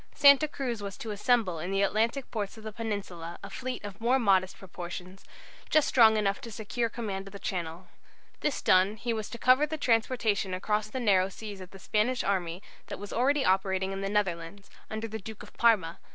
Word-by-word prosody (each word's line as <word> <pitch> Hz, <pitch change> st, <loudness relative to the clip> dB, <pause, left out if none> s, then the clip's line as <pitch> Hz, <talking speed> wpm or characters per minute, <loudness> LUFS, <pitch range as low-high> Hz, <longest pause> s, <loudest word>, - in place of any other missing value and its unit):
Santa 280 Hz, +1 st, +7 dB
Cruz 250 Hz, -7 st, -4 dB
was 200 Hz, -1 st, -6 dB
to 220 Hz, -, -5 dB
assemble 210 Hz, -5 st, +1 dB
in 175 Hz, -, -4 dB
the 195 Hz, +1 st, +1 dB
Atlantic 230 Hz, +6 st, 0 dB
ports 210 Hz, -1 st, -4 dB
of 220 Hz, -, -11 dB
the 215 Hz, -, -5 dB
Peninsula 195 Hz, -6 st, -5 dB
a -, -, -8 dB
fleet 255 Hz, -2 st, -5 dB
of 205 Hz, +1 st, -8 dB
more 245 Hz, +3 st, +3 dB
modest 190 Hz, -6 st, +2 dB
proportions, 180 Hz, 0 st, -8 dB, 0.5 s
just 310 Hz, -2 st, +4 dB
strong 220 Hz, -3 st, +6 dB
enough 200 Hz, -2 st, 0 dB
to 235 Hz, -, -7 dB
secure 230 Hz, +2 st, -2 dB
command 200 Hz, -4 st, -5 dB
of 195 Hz, -, -11 dB
the -, -, -6 dB
Channel. 175 Hz, -2 st, -4 dB, 0.5 s
This 295 Hz, -, -1 dB
done, 185 Hz, +3 st, +4 dB
he 235 Hz, +3 st, -2 dB
was 220 Hz, -2 st, -4 dB
to 235 Hz, -, -7 dB
cover 255 Hz, +5 st, +4 dB
the 315 Hz, +1 st, -4 dB
transportation 225 Hz, -6 st, +1 dB
across 210 Hz, +3 st, -1 dB
the 260 Hz, +5 st, -5 dB
narrow 195 Hz, -5 st, +3 dB
seas 205 Hz, -1 st, -8 dB
of 185 Hz, -, -9 dB
the 195 Hz, -, -12 dB
Spanish 215 Hz, +6 st, 0 dB
army 185 Hz, -2 st, -1 dB, 0.2 s
that -, -, -5 dB
was 205 Hz, 0 st, -8 dB
already 270 Hz, +3 st, +2 dB
operating 190 Hz, 0 st, +1 dB
in 195 Hz, 0 st, -4 dB
the 195 Hz, -, -2 dB
Netherlands, 195 Hz, -1 st, -2 dB, 0.2 s
under 220 Hz, +1 st, -4 dB
the 220 Hz, 0 st, -6 dB
Duke 220 Hz, +1 st, -9 dB
of -, -, -14 dB
Parma. 205 Hz, -8 st, +2 dB
210 Hz, 205 wpm, -29 LUFS, 190-235 Hz, 0.5 s, Santa